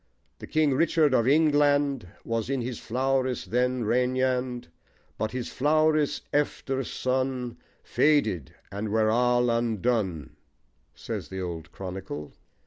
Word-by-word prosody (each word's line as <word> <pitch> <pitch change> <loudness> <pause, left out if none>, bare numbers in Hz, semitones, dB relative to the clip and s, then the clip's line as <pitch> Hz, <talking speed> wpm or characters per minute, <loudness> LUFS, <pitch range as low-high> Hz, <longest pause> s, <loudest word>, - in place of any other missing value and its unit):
The - - -8
king 155 -3 +2
Richard 155 0 +3
of 120 -2 +3
Yngland 145 - +3 0.2
Was 115 0 -2
in 135 -2 0
his 120 -1 -4
flowris 130 +1 -1
then 125 +1 0
regnand: 125 -1 0 0.5
But 110 - 0
his 125 +1 -4
flowris 155 +1 +2
efter 135 -2 0
sone 130 -1 -2 0.3
Fadyt, 110 - +2 0.2
and 105 +2 -4
ware 110 0 +3
all 120 +1 +3
undone: 110 - -1 0.6
says - - -6
the 95 0 -5
old 85 -3 -6
chronicle. 90 -6 -7
125 Hz, 120 wpm, -27 LUFS, 110-135 Hz, 0.6 s, Richard